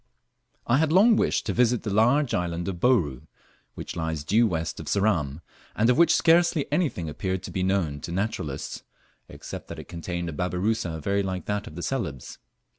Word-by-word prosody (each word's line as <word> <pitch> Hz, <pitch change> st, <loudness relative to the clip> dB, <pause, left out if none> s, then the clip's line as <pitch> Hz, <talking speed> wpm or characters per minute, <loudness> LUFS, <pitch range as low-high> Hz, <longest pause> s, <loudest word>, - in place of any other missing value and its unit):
I 120 Hz, -, +3 dB
HAD 160 Hz, -1 st, +2 dB
long 210 Hz, +6 st, +6 dB
wished -, -, +1 dB
to 100 Hz, -, -1 dB
visit 120 Hz, 0 st, +2 dB
the 105 Hz, -, -2 dB
large 125 Hz, +6 st, +3 dB
island 85 Hz, 0 st, -2 dB
of 90 Hz, -3 st, -4 dB
Bouru, 85 Hz, -, +1 dB, 0.5 s
which -, -, -7 dB
lies 80 Hz, -3 st, -3 dB
due 110 Hz, +9 st, +3 dB
west 85 Hz, -4 st, -3 dB
of -, -, -8 dB
Ceram, 85 Hz, -8 st, 0 dB, 0.3 s
and 115 Hz, +3 st, +3 dB
of 125 Hz, -, +1 dB
which 170 Hz, -, +6 dB
scarcely 170 Hz, -2 st, +4 dB
anything 140 Hz, -, 0 dB
appeared 95 Hz, +4 st, -3 dB
to -, -, -7 dB
be 95 Hz, -, -2 dB
known 90 Hz, -6 st, 0 dB
to 85 Hz, -, -7 dB
naturalists, 90 Hz, -7 st, -3 dB, 0.5 s
except -, -, -8 dB
that -, -, -8 dB
it -, -, -9 dB
contained 85 Hz, +1 st, -4 dB
a 80 Hz, -, -4 dB
babirusa 90 Hz, 0 st, -1 dB
very 100 Hz, +3 st, +1 dB
like 95 Hz, -2 st, -4 dB
that 105 Hz, 0 st, -2 dB
of 75 Hz, -, -10 dB
Celebes. 95 Hz, -, -4 dB
95 Hz, 185 wpm, -26 LUFS, 85-120 Hz, 0.5 s, long